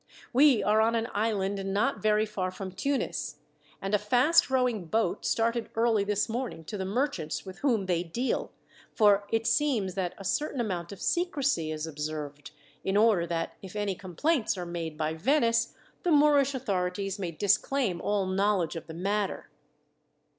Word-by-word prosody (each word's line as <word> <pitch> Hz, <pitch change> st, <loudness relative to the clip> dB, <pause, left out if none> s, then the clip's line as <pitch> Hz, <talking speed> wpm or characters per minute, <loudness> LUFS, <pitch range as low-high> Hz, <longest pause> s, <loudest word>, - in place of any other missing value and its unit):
We 270 Hz, -2 st, +5 dB
are 215 Hz, +1 st, +4 dB
on 225 Hz, +1 st, +2 dB
an 230 Hz, 0 st, -1 dB
island 200 Hz, -2 st, 0 dB
not 200 Hz, +8 st, 0 dB
very 215 Hz, 0 st, +3 dB
far 200 Hz, -4 st, -3 dB
from 190 Hz, 0 st, -7 dB
Tunis, 275 Hz, +9 st, -2 dB, 0.4 s
and 195 Hz, +1 st, -4 dB
a 210 Hz, -, +4 dB
fast 250 Hz, +12 st, +4 dB
rowing 250 Hz, -7 st, +1 dB
boat 200 Hz, +2 st, 0 dB
started 230 Hz, 0 st, 0 dB
early 225 Hz, -2 st, +3 dB
this 205 Hz, 0 st, 0 dB
morning 225 Hz, -8 st, -4 dB
to 205 Hz, +6 st, -6 dB
the 190 Hz, -, -2 dB
merchants 200 Hz, -, -2 dB
with 190 Hz, 0 st, -9 dB
whom 235 Hz, -8 st, +1 dB
they 175 Hz, -2 st, +1 dB
deal, 230 Hz, +10 st, -2 dB, 0.4 s
for 205 Hz, -2 st, +4 dB
it 225 Hz, 0 st, +1 dB
seems 230 Hz, -6 st, +1 dB
that 180 Hz, -2 st, -2 dB
a 195 Hz, -, -9 dB
certain 285 Hz, +7 st, -1 dB
amount 180 Hz, -6 st, -2 dB
of 200 Hz, -, -8 dB
secrecy 280 Hz, -, 0 dB
is 155 Hz, 0 st, -3 dB
observed, 150 Hz, -2 st, -5 dB, 0.3 s
in 195 Hz, +1 st, +1 dB
order 210 Hz, -6 st, +4 dB
that 165 Hz, -1 st, -2 dB
if 190 Hz, 0 st, -10 dB
any 205 Hz, -2 st, -1 dB
complaints 210 Hz, -, -1 dB
are 180 Hz, -, -4 dB
made 165 Hz, -3 st, -5 dB
by 155 Hz, 0 st, -1 dB
Venice, 230 Hz, -, +2 dB, 0.3 s
the 355 Hz, -, -1 dB
Moorish 290 Hz, -3 st, +4 dB
authorities 195 Hz, -4 st, -2 dB
may 180 Hz, -3 st, -2 dB
disclaim 205 Hz, -, +1 dB
all 205 Hz, -2 st, 0 dB
knowledge 190 Hz, -3 st, +1 dB
of 165 Hz, -, -7 dB
the 160 Hz, -, -8 dB
matter." 200 Hz, +3 st, -2 dB
205 Hz, 170 wpm, -28 LUFS, 180-235 Hz, 0.4 s, We